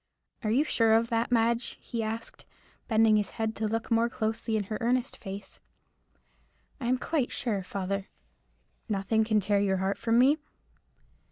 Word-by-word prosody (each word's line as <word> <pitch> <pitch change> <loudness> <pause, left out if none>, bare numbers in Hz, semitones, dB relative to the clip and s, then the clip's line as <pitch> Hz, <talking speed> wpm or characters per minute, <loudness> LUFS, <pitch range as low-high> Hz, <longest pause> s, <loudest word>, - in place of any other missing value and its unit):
"Are 215 - 0
you 250 +7 +3
sure 225 -7 +3
of 230 +1 +3
that, 230 +1 0
Madge?" 235 0 +1
he 230 - -4
asked, 225 +1 -5 0.4
bending 220 -1 +4
his 205 -2 0
head 220 -1 -1
to 220 - 0
look 225 +2 -3
more 230 +1 +3
closely 220 0 -1
in 210 - -1
her 215 +2 -5
earnest 250 +2 +1
face. 195 -1 -8 1.2
"I 240 - -3
am 255 +1 +3
quite 275 -1 -1
sure, 215 -5 -1
father." 195 +1 -3 0.8
"Nothing 210 +2 +1
can 215 -1 +2
tear 200 0 +2
your 195 -1 +1
heart 190 +1 -1
from 230 0 +2
me?" 275 +5 +5
225 Hz, 165 wpm, -29 LUFS, 205-235 Hz, 1.2 s, me